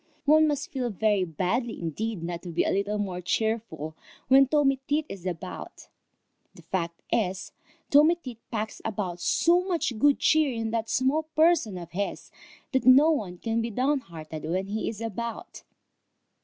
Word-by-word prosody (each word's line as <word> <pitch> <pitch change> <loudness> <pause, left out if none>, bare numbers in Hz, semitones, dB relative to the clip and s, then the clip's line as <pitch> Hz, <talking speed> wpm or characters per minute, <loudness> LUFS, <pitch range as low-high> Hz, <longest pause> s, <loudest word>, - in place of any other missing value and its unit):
One 310 +2 +6
must 290 -1 -2
feel 255 -3 -2
very 210 -2 +1
badly 190 - -2
indeed 180 +4 -3
not 170 0 -4
to 180 - -8
be 170 0 +1
a - - 0
little 200 +2 0
more 190 -3 -3
cheerful 180 -6 -2 0.3
when 270 +1 +7
Tommy 275 -2 +2
Tit 300 +1 +1
is 190 -2 -7
about. 180 +1 -7 0.7
The - - -15
fact 170 -3 -3
is, 190 -4 -1 0.4
Tommy 300 +4 +6
Tit 255 -9 -10
packs 220 -2 -4
about 195 -5 -3
so 340 - +3
much 335 - -1
good 285 +3 +5
cheer 310 -3 +3
in 225 -2 -3
that 225 -1 -2
small 265 +5 +2
person 310 - +3
of 170 -1 -9
his, 200 +3 -4 0.4
that 260 -2 0
no 280 +5 +8
one 195 - -2
can 225 +4 -1
be 230 - -2
downhearted 205 - -2
when 180 +5 -1
he 215 +1 -2
is 220 -1 -7
about. 230 +1 -5
225 Hz, 165 wpm, -27 LUFS, 185-270 Hz, 0.7 s, no